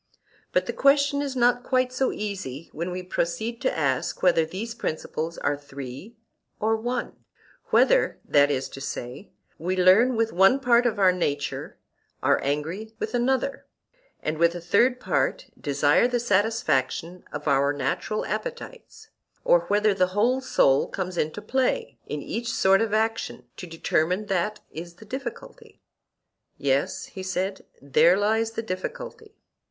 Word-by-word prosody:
But - - +2
the - - -3
question 280 0 +3
is 275 -2 -3
not 245 0 +3
quite 255 0 0
so 260 +1 +1
easy 185 -9 -5
when 170 +3 -3
we 180 0 -5
proceed 220 +6 -2
to - - 0
ask 135 -4 -1
whether 170 -3 +4
these 210 +7 -5
principles 165 -5 -4
are 145 0 0
three 140 - -9 0.4
or 220 +1 +2
one; 240 +3 -3 0.5
whether, - - +3
that 145 0 +4
is 135 -2 -1
to 135 - -9
say, 125 +7 -6 0.3
we 180 +3 -1
learn 195 +8 +5
with 225 0 0
one 195 +9 +5
part 245 -2 +4
of 225 - -1
our 190 -2 +5
nature, 145 -6 -3 0.5
are - - +3
angry 165 +10 -3
with 220 - -4
another, 260 +3 0 0.6
and 155 0 -2
with 170 +1 +3
a - - -4
third 235 +9 +2
part - - 0
desire 145 - +3
the 245 -1 0
satisfaction 190 - 0
of 150 +1 -6
our 140 0 +3
natural 175 +8 -2
appetites; 475 -2 -6 0.3
or - - +4
whether 210 0 +3
the 185 -1 +2
whole 250 +5 +3
soul 135 - +3
comes 185 -1 -4
into 165 +5 -2
play 260 +4 -1
in 150 -1 -4
each 235 +1 -3
sort 195 -1 +4
of 225 -2 0
action—to 200 - -2
determine 165 +4 0
that 210 +2 -1
is 170 +2 -8
the 220 - -14
difficulty. 255 +2 -8 0.8
Yes, 140 0 0
he 190 - -9
said; 185 +1 -3
there 155 +6 +4
lies 220 +2 +1
the 225 - -3
difficulty. 440 - -6
195 Hz, 150 wpm, -25 LUFS, 160-240 Hz, 0.8 s, learn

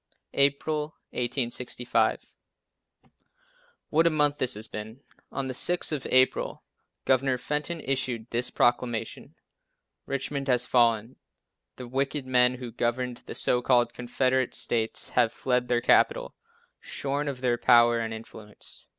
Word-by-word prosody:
April, 150 +2 +1 0.2
1865. 125 0 -1 1.6
What 165 +2 +4
a - - +5
month 150 -2 +1
this 130 - +1
has 110 +2 -4
been. 110 +4 -8 0.3
On 135 - -3
the 130 - -4
6th 175 +7 +1
of 150 -4 -3
April 130 0 +2 0.4
Governor 130 0 +2
Fenton 150 +6 -3
issued 130 -5 -2
this 120 +1 +1
proclamation: 120 -1 -1 0.7
"Richmond 140 0 -3
has 125 -2 +3
fallen. 115 -1 +2 0.6
The 125 - -9
wicked 135 +2 -2
men 125 -1 +3
who 125 -2 -7
governed 120 +1 -2
the - - -7
so 125 - +2
called 120 -2 +2
Confederate 130 +1 0
States 115 -1 -1
have 120 -2 +2
fled 125 0 -1
their 120 -1 +1
capital, - - +2 0.4
shorn 140 +1 -3
of 135 -3 -4
their 120 -2 +1
power 120 -1 +5
and 115 -1 -3
influence. 110 -1 -9
125 Hz, 130 wpm, -27 LUFS, 120-135 Hz, 1.6 s, a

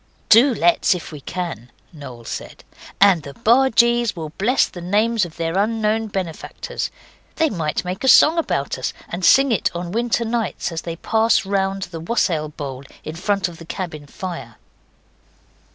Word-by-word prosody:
'Do 240 +6 +7
let's, 175 0 +3
if 175 - -7
we 150 -2 -9
can,' 165 -7 -5 0.2
Noel 130 -6 -10
said, - - -7 0.4
'and 195 -4 +5
the 140 -1 -10
bargees 235 -2 +3
will 160 -3 -5
bless 235 - +2
the 175 - -10
names 210 +3 +1
of 165 - -12
their 165 +2 -1
unknown 220 +1 0
benefactors. 190 -6 -4 0.5
They 320 -2 +1
might 165 0 -2
make 180 +5 -4
a - - +1
song 315 +5 +7
about 140 - -2
us, 130 - -2 0.2
and 175 +2 -5
sing 270 +7 +5
it 220 - +1
on 175 0 -4
winter 235 +2 0
nights 225 -5 -2
as 165 - -4
they 165 -1 -5
pass 220 +3 +2
round 195 0 -1
the 170 -3 -7
wassail 165 -4 0
bowl 140 -3 -7 0.2
in 155 - -6
front 195 +2 0
of 170 -2 -11
the 165 - -10
cabin 160 -5 -6
fire. 170 - -7
185 Hz, 170 wpm, -21 LUFS, 165-225 Hz, 0.5 s, Do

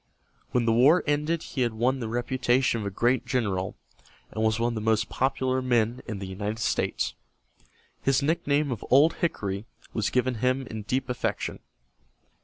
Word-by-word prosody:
When 125 -2 +1
the 115 - +3
war 140 +10 +5
ended 150 +3 0
he 135 - -4
had 120 -3 0
won 125 +4 +1
the 115 - -3
reputation 120 0 +1
of 100 - -3
a - - 0
great 120 +5 +1
general, 105 -7 -1 0.6
and 110 - -2
was 110 0 +2
one 120 +1 +2
of - - -3
the 110 - -3
most 110 0 +1
popular 130 0 0
men 120 -2 +1
in 110 -4 -4
the 95 - -5
United 100 +3 -4
States. 115 - -1 0.9
His 135 +1 +2
nickname 145 -2 +1
of 115 - -4
"Old 145 +5 +6
Hickory" 100 - -2 0.3
was 110 -2 0
given 125 -2 0
him 130 +1 +1
in 110 -2 -6
deep 130 +6 -1
affection. 115 -4 -2
120 Hz, 175 wpm, -27 LUFS, 110-130 Hz, 0.9 s, Old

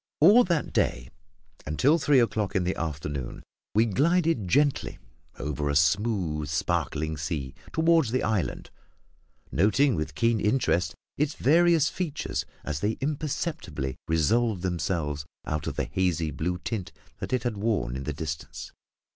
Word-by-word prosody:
All 205 +11 +8
that 170 -4 -1
day, - - 0 0.6
until 135 - +3
three 145 -2 +4
o'clock 105 -4 0
in 95 - +2
the 90 +1 -1
afternoon, 75 -5 -4 0.3
we 110 +2 +5
glided 155 - +2
gently 140 +7 +1 0.4
along 75 - -5
over 75 0 -2
a 70 - 0
smooth, 80 -2 +1
sparkling 80 0 -1
sea, 70 -3 -3 0.2
toward 160 -3 +3
the 130 +3 0
island, 105 -4 -1 0.8
noting 125 - +3
with 75 -4 -3
keen 115 +4 +2
interest 105 -5 +1 0.2
its 150 0 +1
various 165 +1 +4
features 165 -5 -3 0.2
as 75 -1 -3
they 105 +6 -1
imperceptibly 140 - -3
resolved 95 +5 +2
themselves 80 -5 -2 0.2
out 75 -2 -2
of - - -3
the - - -1
hazy 85 -4 0
blue 85 +5 -2
tint 95 0 -4 0.3
that - - -5
it 130 - 0
had 120 -3 -1
worn 100 - 0
in 65 0 -5
the 75 - -2
distance. 75 0 -6
95 Hz, 145 wpm, -27 LUFS, -, 0.8 s, All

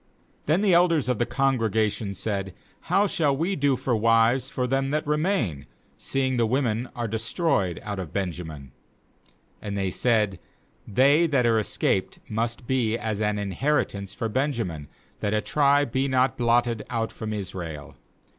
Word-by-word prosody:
16Then 160 +6 +3
the 195 -4 +4
elders 170 -4 +4
of 125 - 0
the 120 - +1
congrega 115 -5 +1
tion 100 -2 -5
said: 95 -2 -3 0.3
'How 200 - +3
shall 150 -8 +1
we 175 +6 0
do 140 -3 +2
for 130 -1 -1
wives 115 +3 +3
for 125 - -2
them 135 +1 0
that 150 +2 -1
remain, 150 - 0 0.3
seeing 130 -1 -1
the 115 -1 +2
wom 130 +4 +1
en 115 +2 -2
are 120 -1 -2
destroyed 110 - 0
out 105 -2 -4
of 90 -5 -6
Benjamin?' 80 -8 -5 0.9
17And 100 -1 -4
they 95 -2 -1
said: 105 -5 +1 0.5
"They 140 - +4
that 135 -5 +2
are 115 -1 +3
escaped 105 - -1
must 115 +3 -3
be 115 -3 +1
as 110 -2 -3
an 105 -1 +1
inheritance 100 -1 -1
for 115 - -2
Benjamin, 110 - -2 0.3
that 105 +1 0
a - - +2
tribe 145 -1 +2
be 135 +2 +1
not 130 -2 +2
blotted 120 -1 +2
out 115 -2 -2
from 110 -1 -6
Israel. 90 -7 -6
115 Hz, 165 wpm, -25 LUFS, 105-135 Hz, 0.9 s, the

